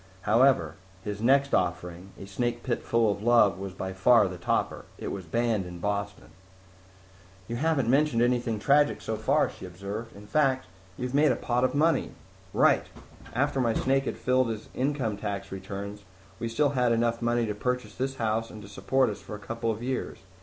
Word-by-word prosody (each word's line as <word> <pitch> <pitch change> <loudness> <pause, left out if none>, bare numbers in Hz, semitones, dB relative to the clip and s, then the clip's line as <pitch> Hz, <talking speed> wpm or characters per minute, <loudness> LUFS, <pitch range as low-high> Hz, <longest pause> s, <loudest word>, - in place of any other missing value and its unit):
However, 125 +6 +3 0.3
his 105 0 -5
next 140 +4 +3
offering, 90 +1 -1
A - - -8
Snake 120 +4 -2
Pit 120 - -1
Full 115 -2 +2
of 100 - -4
Love, 110 -5 +4
was 100 0 -5
by 95 0 -5
far 105 +3 +5
the 90 -1 -7
topper. 85 - -1
It - - -5
was 95 -2 -5
banned 110 +1 0
in 90 0 -8
Boston." 100 +2 -3 1.2
"You 120 - -3
haven't 145 -3 +1
mentioned 135 -2 +3
anything 120 -2 +1
tragic 145 +7 +3
so - - -3
far," - - +2
she - - -12
observed. 100 +5 -7
"In 100 +1 -12
fact, 130 +2 +1 0.3
you 125 - -3
have 125 - -5
made 150 +2 +4
a - - +1
pot 125 +1 -1
of 130 - +1
money." 160 +3 +2 0.4
"Right. - - +3 0.5
After 135 +1 +1
my 115 -2 +1
snake 135 +1 +1
had - - -3
filed 130 -1 +2
his 110 -1 -5
income 130 -6 -1
tax 100 -2 -4
returns, 100 +2 -6 0.4
we 115 - -2
still 145 +5 +2
had 125 -3 +1
enough 115 0 +1
money 120 0 +1
to 105 - -2
purchase 125 0 -2
this 135 +3 -3
house 115 -1 -1
and 110 - -10
to - - -10
support 105 +7 +1
us 105 - -8
for 105 - -8
a - - -6
couple 115 +3 -4
of 110 +1 -3
years. 130 0 -3
115 Hz, 195 wpm, -27 LUFS, 100-130 Hz, 1.2 s, far